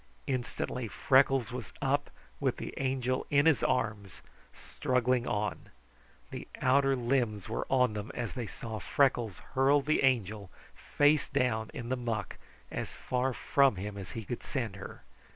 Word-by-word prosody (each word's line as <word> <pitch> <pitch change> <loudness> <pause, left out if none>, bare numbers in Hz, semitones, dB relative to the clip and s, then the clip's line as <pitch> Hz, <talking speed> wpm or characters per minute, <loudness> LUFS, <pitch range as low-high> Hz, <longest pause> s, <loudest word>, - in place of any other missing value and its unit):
Instantly 125 -1 -2
Freckles 135 -2 +3
was 125 -6 -6
up, 145 +1 0 0.3
with - - 0
the - - -6
Angel 130 -1 -1
in 145 0 +4
his 160 -3 +4
arms, 105 -6 -1 0.3
struggling 125 -1 0
on. 105 0 -2 0.6
The - - -6
outer 135 +1 +4
limbs 120 -5 0
were 110 - -3
on 125 -4 +3
them 105 0 -5
when 120 -2 -2
they 120 -4 -4
saw 110 0 -6
Freckles 120 -4 +1 0.2
hurl 135 +2 +4
the 155 +2 +1
Angel, 110 -6 +1 0.2
face 145 0 +2
down, 110 -3 0
in 120 -1 -6
the 130 - +1
muck, 115 -3 -3 0.3
as - - -4
far 130 +1 -1
from 135 0 +3
him 100 +2 -5
as 100 -2 -7
he 115 -2 -5
could 120 - -4
send 115 -8 -3
her. 95 - -9
125 Hz, 150 wpm, -31 LUFS, 110-135 Hz, 0.6 s, in